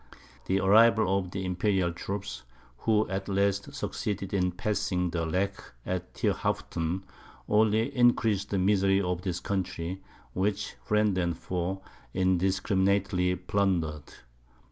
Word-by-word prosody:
The 95 +1 +2
arrival 105 0 +5
of 90 -2 -5
the 95 +1 -4
Imperial 90 -1 +1
troops, 100 +3 -5 0.4
who 110 -1 +2
at 95 +1 -4
last 100 +4 +1
succeeded 105 -7 -3
in 90 -2 +2
passing 90 -1 -1
the 85 -1 -1
Lech 100 +4 -1 0.2
at 90 -1 -4
Thierhaupten, 85 +4 -1 0.4
only 110 +5 +2
increased 115 -5 +3
the 100 - 0
misery 95 0 +3
of 90 -2 -1
this 90 -2 -2
country, 95 -1 -3 0.3
which 100 +2 -1
friend 105 -2 +2
and 85 -2 -1
foe 95 +1 -3 0.3
indiscriminately 95 0 +2
plundered. 90 -6 -1
95 Hz, 120 wpm, -28 LUFS, 90-100 Hz, 0.4 s, arrival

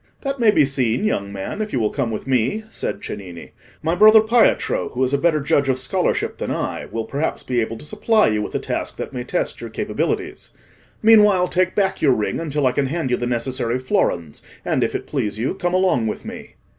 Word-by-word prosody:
"That 275 -1 -3
may 230 -2 +5
be 155 -8 +5
seen, 130 - 0
young 100 - -1
man, 100 - -5
if 215 - -3
you 130 - 0
will 110 -2 0
come 115 - -1
with 110 - -5
me," 130 - 0
said - - -4
Cennini. 90 -5 -8 0.3
"My 160 +2 +1
brother 215 +4 +7
Pietro, 225 +1 +2
who 130 - -2
is 130 +1 0
a - - +4
better 165 -1 +2
judge 140 -1 +1
of 130 - +2
scholarship 130 - -1
than - - -3
I, - - -3
will 115 -1 -4
perhaps 140 +7 -3
be 125 -2 0
able 115 0 -3
to 150 - -10
supply 215 +4 +2
you 105 -1 0
with 105 - -5
a - - +1
task - - -4
that - - -6
may 125 -1 -4
test - - -2
your - - -6
capabilities. - - -3 0.5
Meanwhile, 210 -5 +6
take 185 0 +1
back 190 -2 0
your 140 -4 +4
ring 105 - -2
until 150 -3 -1
I 130 - +4
can 135 +1 0
hand 155 -2 -2
you 125 - +2
the 120 - -3
necessary 120 0 -1
florins, 85 - -1 0.2
and, - - +1
if - - -1
it - - -3
please 105 0 -2
you, 115 +4 -1
come 175 -1 -1
along 185 -12 +2
with 105 - -5
me." - - -9
135 Hz, 225 wpm, -21 LUFS, 115-185 Hz, 0.5 s, brother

